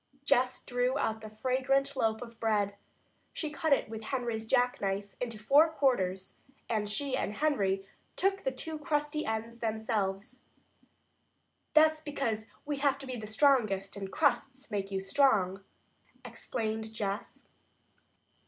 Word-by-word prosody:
Jess 255 -2 +2
drew 250 +1 0
out 220 0 -1
the 215 - -8
fragrant 265 +4 +1
loaf 225 -2 +1
of 230 -1 -12
bread. 205 -3 +1 0.6
She 310 -3 -3
cut 315 +1 -1
it 275 - +4
with 220 0 -7
Henry's 235 -3 -2
jackknife 205 -6 +1
into 230 -3 -3
four 280 +10 +5
quarters, 190 -11 0 0.3
and 215 -2 -1
she 270 +5 -1
and 210 - -2
Henry 195 -11 +1 0.3
took 390 0 +1
the - - +2
two 310 +4 -5
crusty 295 +1 -1
ends 225 +1 -3
themselves. 220 0 -2 1.3
"That's 310 0 +6
because 235 -8 -2 0.2
we 290 -1 -2
have 280 -1 +2
to 275 - -9
be 255 -1 -4
the 220 -3 -6
strongest, 215 -5 +2
and 195 -1 -6
crusts 270 -3 0
make 200 -1 -2
you 195 -1 -1
strong," 195 -4 +2 0.6
explained 220 0 -3
Jess. 205 -3 -4
235 Hz, 135 wpm, -31 LUFS, 210-275 Hz, 1.3 s, That's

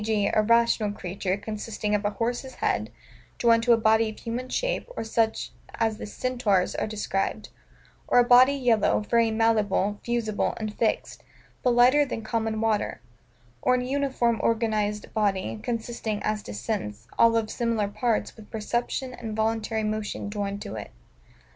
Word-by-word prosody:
g. 210 -2 +1
a 215 - +4
rational 230 -1 +3
creature, 190 -1 -3
consisting 210 0 -4
of 210 0 +1
a 205 - +1
horse's 245 +4 -3
head, - - -1 0.5
joined 230 -1 +4
to 240 +1 +2
a 230 - +7
body 220 0 +3
of 215 - -9
human 245 +2 -5
shape, - - -1
or - - -2
such 220 0 0 0.2
as 220 -1 0
the - - -6
CENTAURS 210 -5 0
are - - -2
described: 210 0 -2 0.6
or, - - +3
a 245 - +8
body 250 +3 +7
yellow, 240 -7 +2
very 230 +2 +2
malleable, 215 -2 +1
fusible, 235 -3 -1
and 215 -1 -4
fixed, 225 - -1 0.4
but 245 -2 +2
lighter 255 +5 +6
than 245 -5 -4
common 220 -1 -1
water: 220 -2 0 0.6
or 255 - +3
an 250 - 0
uniform, 255 -3 0
unorganized 215 -2 0
body, 195 - 0
consisting, 230 -2 -3
as 215 0 -1
to - - -9
sense, 105 +1 -4
all 230 0 +6
of 220 -1 -1
similar 230 -3 0
parts, 230 +2 -1
with 220 -2 -14
perception 240 +4 -2
and 225 -3 -6
voluntary 220 0 0
motion 215 -1 -3
joined 200 -1 -3
to - - -7
it. 105 - -6
220 Hz, 160 wpm, -26 LUFS, 210-235 Hz, 0.6 s, a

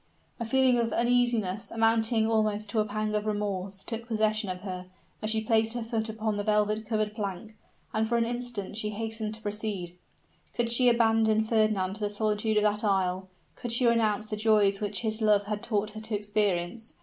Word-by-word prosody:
A 235 - -2
feeling 255 +1 +3
of 230 -1 0
uneasiness, 235 -5 +1
amounting 225 0 +2
almost 215 -1 0
to 225 - 0
a 215 - +2
pang 215 0 -2
of 210 0 -1
remorse, 200 -2 -3
took 230 0 -5
possession 215 -2 0
of 180 0 -4
her, 185 -2 -6 0.3
as 215 - -1
she 220 0 +1
placed 225 0 +2
her 240 -1 -3
foot 225 -1 -2
upon 220 -1 -2
the 205 - -2
velvet 210 +1 +1
covered 215 -2 -1
plank; 210 0 -5 0.4
and 220 0 0
for 235 - +2
an 230 - +2
instant 235 -4 -4
she 210 - -1
hesitated 220 0 -3
to 220 - -6
proceed. 205 -4 -4 0.6
Could 235 -1 0
she 245 +1 +5
abandon 225 -2 +3
Fernand 215 -4 +1
to - - -13
the 205 - 0
solitude 215 +1 0
of 210 - +3
that 210 +1 +1
isle? 190 -2 0 0.3
Could 240 - -4
she 240 +2 +3
renounce 220 -3 +2
the 215 - -4
joys 210 -2 +3
which 205 -2 -2
his 220 -1 -2
love 210 -2 +4
had 210 0 -4
taught 210 -1 -1
her 215 - -8
to 220 0 -2
experience? 205 0 -1
215 Hz, 195 wpm, -28 LUFS, 205-225 Hz, 0.6 s, she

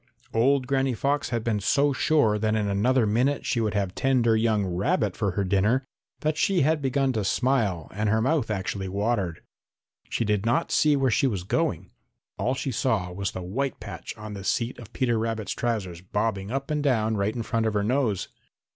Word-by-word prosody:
Old 130 +3 +3
Granny 135 -1 +1
Fox 140 +5 0
had 115 -2 -2
been 110 -3 0
so 140 +8 +2
sure 130 -7 +2
that 110 0 +1
in 105 -2 0
another 115 +5 +2
minute 125 +7 +1
she 115 - 0
would 105 -2 -1
have 100 -3 0
tender 125 -4 +2
young 110 -2 +2
rabbit 95 - 0
for 100 -6 -1
her 100 - 0
dinner 105 +7 +2 0.4
that 155 0 0
she 190 -4 +2
had 155 +2 +2
begun 135 0 +1
to 110 -3 -1
smile 105 - +1
and 105 +2 0
her 110 +1 +3
mouth 135 +1 +1
actually 95 -1 -2
watered. 100 -3 -1 0.7
She 115 - -1
did 105 -1 +1
not 120 +8 +1
see 150 -1 +4
where 135 -3 +2
she 135 - +3
was 100 -8 -2
going. 95 - -1 0.5
All 130 +2 0
she 135 0 -3
saw 105 -7 0
was 100 +2 -2
the 95 - -6
white 130 +9 -2
patch - - -8
on 105 0 -7
the 100 -1 -7
seat 120 +5 -1
of 115 -2 -11
Peter 120 -4 0
Rabbit's 110 -2 -2
trousers 100 -8 -2
bobbing 100 +1 -2
up 135 +4 -3
and 150 -1 0
down 110 -6 +1
right 100 +2 0
in 115 - -2
front 115 0 0
of 110 - -1
her 100 - +1
nose. 115 -4 0
115 Hz, 200 wpm, -26 LUFS, 100-130 Hz, 0.7 s, see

